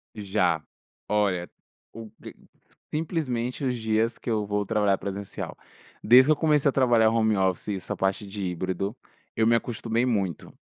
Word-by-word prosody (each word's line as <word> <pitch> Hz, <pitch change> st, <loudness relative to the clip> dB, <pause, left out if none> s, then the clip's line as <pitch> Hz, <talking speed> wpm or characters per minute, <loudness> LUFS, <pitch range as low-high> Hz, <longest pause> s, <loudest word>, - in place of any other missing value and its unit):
Já. 95 Hz, -6 st, 0 dB, 0.5 s
Olha, 100 Hz, -4 st, 0 dB, 0.4 s
o 115 Hz, -1 st, -9 dB
pre -, -, -11 dB, 0.6 s
simplesmente 145 Hz, -6 st, -2 dB
os 125 Hz, -1 st, 0 dB
dias 110 Hz, +1 st, 0 dB
que -, -, -7 dB
eu 110 Hz, -2 st, 0 dB
vou 105 Hz, 0 st, -1 dB
trabalhar 105 Hz, -2 st, +2 dB
presencial. 100 Hz, 0 st, -6 dB, 0.5 s
Desde 125 Hz, +4 st, +7 dB
que 155 Hz, -, +4 dB
eu -, -, +5 dB
comecei 150 Hz, -2 st, +2 dB
a -, -, +1 dB
trabalhar 120 Hz, -4 st, +4 dB
home 110 Hz, -2 st, +2 dB
office 95 Hz, -2 st, 0 dB
e -, -, -1 dB
essa 95 Hz, -, -5 dB
parte 95 Hz, +2 st, -1 dB
de 100 Hz, -1 st, -5 dB
híbrido, 95 Hz, +4 st, -3 dB, 0.4 s
eu 110 Hz, -, +2 dB
me 115 Hz, -, +4 dB
acostumei 115 Hz, 0 st, -1 dB
muito. 100 Hz, -, -2 dB
110 Hz, 165 wpm, -26 LUFS, 100-120 Hz, 0.6 s, Desde